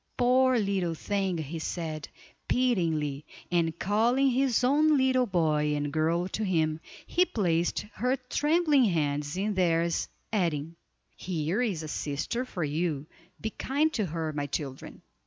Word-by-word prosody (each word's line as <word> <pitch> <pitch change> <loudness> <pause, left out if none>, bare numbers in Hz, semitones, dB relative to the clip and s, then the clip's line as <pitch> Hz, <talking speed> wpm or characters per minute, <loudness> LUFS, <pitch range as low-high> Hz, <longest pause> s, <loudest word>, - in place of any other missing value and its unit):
poor 255 +1 +4
little 195 -5 0
thing!" 195 0 -1
he 160 +1 -4
said, 160 -2 -4 0.4
pityingly, 160 - +1 0.3
and 170 -2 +1
calling 240 +8 +2
his 255 -1 +2
own 300 +4 +4
little 260 -1 +3
boy 155 -5 +1
and 145 0 -2
girl 165 +3 +1
to 215 +3 -3
him, 160 -5 +1 0.3
he 360 - +3
placed 175 - 0
her 250 +3 +1
trembling 295 +2 +2
hands 150 -4 0
in 205 +2 0
theirs, 170 -2 +1 0.3
adding: 165 -5 -1 0.4
"Here 175 +4 -2
is 195 -10 -1
a - - -5
sister 150 - -2
for 180 -9 -4
you, 150 -1 -1 0.3
be 220 - -3
kind 300 +8 0
to 210 -4 0
her, 160 -1 -3
my 145 -1 -2
children." 135 -2 -6
175 Hz, 140 wpm, -28 LUFS, 155-245 Hz, 0.4 s, poor